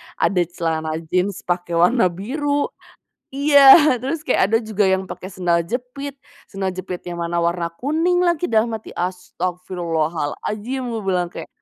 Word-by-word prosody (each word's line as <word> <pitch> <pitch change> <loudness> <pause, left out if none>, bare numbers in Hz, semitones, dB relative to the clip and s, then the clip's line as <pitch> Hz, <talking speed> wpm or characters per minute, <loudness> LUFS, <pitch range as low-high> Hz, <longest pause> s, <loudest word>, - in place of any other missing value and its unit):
ada 185 -2 +1
celana 160 -2 -2 0.2
jeans 185 +1 0
pake 175 -1 -2
warna 185 +5 +4
biru. 285 - -2 0.6
Iya, 285 +1 +4 0.4
terus 295 +4 -3
kayak - - +2
ada 225 - +4
juga 215 -3 0
yang 190 0 +1
pake 185 0 -8
sendal 175 -2 +1
jepit, 250 - -5 0.3
sendal 190 -2 -3
jepit 185 0 -5
yang 175 -1 -5
mana 170 0 -2
warna 170 0 0
kuning 335 +6 +1
lagi, 345 0 +1
dalam 225 0 +2
hati, 220 - -6
astaghfirullahal'adzim, 180 - -3
gua 225 -2 -3
bilang 180 -2 0
kayak - - -8
190 Hz, 145 wpm, -21 LUFS, 175-250 Hz, 0.6 s, warna